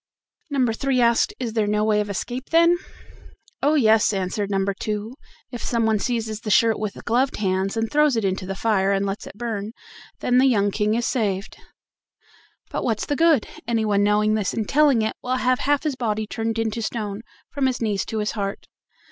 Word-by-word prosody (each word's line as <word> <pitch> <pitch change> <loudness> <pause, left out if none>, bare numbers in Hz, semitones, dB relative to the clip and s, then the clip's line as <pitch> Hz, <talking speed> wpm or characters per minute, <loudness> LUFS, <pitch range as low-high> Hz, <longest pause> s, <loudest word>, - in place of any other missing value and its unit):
Number 260 -5 +1
three 265 +2 0
asked: 235 -1 +3
"Is 235 -4 -3
there 220 -2 +1
no 210 0 +1
way 210 -1 +2
of 205 - -4
escape, 245 +6 -4
then?" 335 +1 +5 0.9
"Oh! 295 +3 +3
yes," 220 -6 +4
answered 195 +1 -2
number 195 0 0
two: 210 +3 -4 0.4
"If 245 - -6
someone 220 -3 +1
seizes 225 -2 -2
the 225 -2 -6
shirt 225 +1 +4
with 210 -2 -4
gloved 250 +3 +1
hands 195 +1 -1
and 225 0 0
throws 300 +1 +3
it 225 -3 0
into 190 -1 -2
the 195 - -3
fire, 195 -2 +1
and 195 0 0
lets 195 +1 -4
it - - -12
burn, 220 -2 -4 0.5
then 250 0 +2
the 265 - +5
young 205 -5 +2
King 210 +1 0
is 235 0 0
saved. 200 -5 -1 1.2
But - - -2
what's 225 -3 -1
the 290 - -1
good? 320 -5 +3 0.2
Anyone 220 -3 +1
knowing 210 +1 +3
this 210 -3 -1
and 220 -3 -2
telling 280 -6 +4
it 220 - -2
will 255 0 -1
have 255 0 +1
half 290 +1 +1
his 300 -4 -1
body 220 -3 -2
turned 225 +1 -3
into 225 0 -1
stone, 215 -2 -4 0.3
from 275 -2 0
his 255 -1 -1
knees 210 -4 0
to 220 - -3
his 210 0 -1
heart." 200 -2 -4
220 Hz, 200 wpm, -23 LUFS, 205-245 Hz, 1.2 s, then